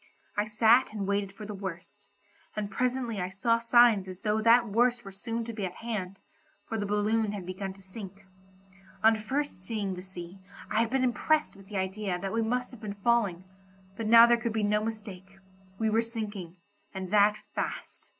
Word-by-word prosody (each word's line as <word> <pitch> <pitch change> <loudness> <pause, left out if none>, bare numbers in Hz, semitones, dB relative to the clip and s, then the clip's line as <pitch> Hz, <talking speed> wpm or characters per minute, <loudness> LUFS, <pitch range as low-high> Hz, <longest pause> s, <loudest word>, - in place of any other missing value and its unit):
I 205 - +1
sat 225 +4 +4
and 210 -2 -3
waited 200 -1 0
for 210 +2 -10
the 210 - -6
worst, 190 -3 -8 0.5
and 210 -1 -3
presently 250 -4 -1
I 180 - -2
saw 230 +5 +1
signs 230 -4 +5
as 185 -1 -9
though 215 0 +1
that 230 +1 +5
worst 240 +2 +2
were 195 - -7
soon 225 +4 -4
to 230 0 -6
be 210 -2 -4
at 180 -1 -3
hand, 200 -5 -4 0.5
for 225 - -3
the 205 - -2
balloon 210 +1 +1
had 195 -3 -6
begun 190 +1 -5
to 195 0 -17
sink. 195 0 -10 0.8
On 220 0 +7
first 240 -1 -3
seeing 200 -1 -2
the 180 - -6
sea 185 0 -10 0.3
I 215 - +2
had 230 0 +2
been 265 +1 +1
impressed 300 +4 +1
with 195 -1 -15
the 205 -1 -5
idea 190 0 -2
that 195 +2 -4
we 230 - +1
must 250 +3 -1
have 245 - -12
been 205 -2 -5
falling, 200 -4 +1 0.5
but 225 0 -3
now 230 +1 +9
there 240 0 +4
could 235 -2 -1
be 220 -1 0
no 210 +1 +2
mistake, 200 -4 -7 0.4
we 220 - 0
were 225 +1 +3
sinking, 210 -6 -6 0.4
and 190 -1 -5
that 210 0 +5 0.2
fast. - - -5
210 Hz, 200 wpm, -29 LUFS, 195-230 Hz, 0.8 s, now